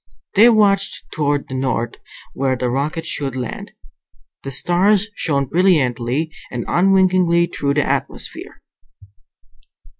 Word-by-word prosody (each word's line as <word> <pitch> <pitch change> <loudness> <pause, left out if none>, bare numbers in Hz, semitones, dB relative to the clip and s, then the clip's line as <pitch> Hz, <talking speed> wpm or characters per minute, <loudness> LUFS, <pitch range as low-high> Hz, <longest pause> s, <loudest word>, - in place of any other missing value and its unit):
They 220 +4 +7
watched 205 -3 +2
toward 145 -2 -1
the - - -8
north, 130 -3 -2 0.4
where 135 -1 0
the 125 -1 -2
rocket 150 +5 -2
should 135 -3 -3
land. 125 -3 -5 0.7
The 135 - -6
stars 190 - +2
shone 140 -7 0
brilliantly 145 -4 +1 0.2
and 120 -2 -5
unwinkingly 185 -2 +3
through 140 -4 -2
the 145 - +2
atmosphere. - - -4
150 Hz, 115 wpm, -19 LUFS, 130-185 Hz, 0.7 s, They